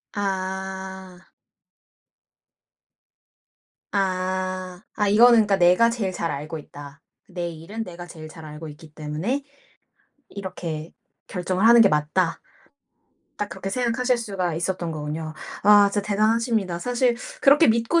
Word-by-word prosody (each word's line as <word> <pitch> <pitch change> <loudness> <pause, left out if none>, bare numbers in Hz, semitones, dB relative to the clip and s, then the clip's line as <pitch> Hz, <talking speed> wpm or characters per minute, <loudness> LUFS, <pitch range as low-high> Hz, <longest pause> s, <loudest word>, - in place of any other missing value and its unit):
아. 190 -1 -4 2.7
아. 185 -1 -2 0.2
아 210 -1 +1
이거는 230 +4 +7
그러니까 200 -1 +2
'내가 180 +6 +5
제일 215 -5 -2
잘 165 -3 -2
알고 150 +3 -5
있다. 145 0 -11 0.3
내 175 -2 -4
일은 170 +8 -6
내가 175 -3 -9
제일 160 -2 -10
잘 160 0 -12
알고 155 +1 -8
있기 155 +1 -13
때문에 160 - -3 0.9
이렇게 170 -5 -6 0.3
결정을 185 +3 0
하는 235 0 +8
게 200 - +6
맞다.' 165 +3 0 1.0
딱 205 - -3
그렇게 190 0 -5
생각하실 245 +2 +1
수가 195 -7 -2
있었던 175 0 -2
거군요. 155 +1 -5 0.3
아 205 0 +7
진짜 205 -1 -1
대단하십니다. 215 -3 +1
사실 245 +2 +1 0.3
그렇게 285 +1 +6
믿고 230 +9 +3
190 Hz, 255 characters per minute, -24 LUFS, 165-210 Hz, 2.7 s, 하는